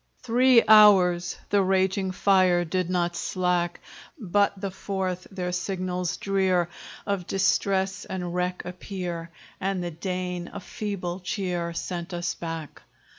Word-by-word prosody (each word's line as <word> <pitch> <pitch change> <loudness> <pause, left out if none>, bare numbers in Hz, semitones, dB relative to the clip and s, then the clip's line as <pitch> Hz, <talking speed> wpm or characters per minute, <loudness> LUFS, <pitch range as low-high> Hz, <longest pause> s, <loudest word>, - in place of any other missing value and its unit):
Three 250 0 +5
hours 185 -5 +6 0.2
the 205 -1 +4
raging 190 0 +1
fire 185 -2 +3
Did 180 +1 -1
not 175 -1 0
slack; 180 -1 -1 0.4
But 200 - +1
the 195 -1 -3
fourth, 185 -1 -3
their 180 -2 -3
signals 180 -1 -2
drear 190 -3 +1 0.4
Of 200 -3 -2
distress 195 0 +1
and 180 -2 -4
wreck 180 0 -1
appear, 180 -2 -5 0.3
And 190 -1 -1
the 175 - -3
Dane 180 +1 -4
a - - -6
feeble 190 -3 -4
cheer 180 -2 -2
Sent 175 +1 -4
us 175 0 -2
back. 165 -3 -6
185 Hz, 125 wpm, -26 LUFS, 175-195 Hz, 0.4 s, hours